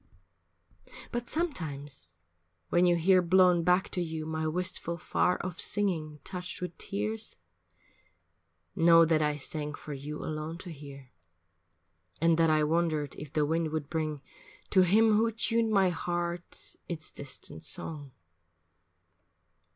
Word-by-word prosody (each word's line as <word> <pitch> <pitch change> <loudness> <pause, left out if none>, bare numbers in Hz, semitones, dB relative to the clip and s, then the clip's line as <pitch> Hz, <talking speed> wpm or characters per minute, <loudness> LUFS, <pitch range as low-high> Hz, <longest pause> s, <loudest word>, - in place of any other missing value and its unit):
But 240 -1 -4
sometimes 145 - -4 0.5
when 175 +1 +4
you 175 - +4
hear 185 +2 +4
blown 180 0 +5
back 180 +2 +3
to 180 - -1
you 160 -2 -4
My 160 0 -2
wistful, 170 0 -2
far 180 +2 +1
off 180 -2 -5
singing 165 -7 +1
touched 180 -1 -6
with 180 -2 -5
tears, 105 +2 -3 1.4
Know 165 0 +7
that 160 -1 +2
I 150 -1 +1
sang 150 +1 -4
for 150 - -8
you 145 +2 -6
alone 155 +2 -4
to 180 -1 -9
hear, 140 -3 -11 1.1
And 165 0 +4
that 165 -1 +5
I 155 -1 +3
wondered 155 -2 0
if 150 - -9
the 150 -1 +1
wind 160 +1 0
would 155 -2 -4
bring 155 -3 -2 0.5
To 190 - +6
him 210 +4 +5
who 225 +1 +2
tuned 230 0 +1
my 195 -3 +4
heart 175 0 -4
its 160 -2 -4
distant 140 +3 -7
song. 150 -3 -3
165 Hz, 135 wpm, -30 LUFS, 150-180 Hz, 1.4 s, Know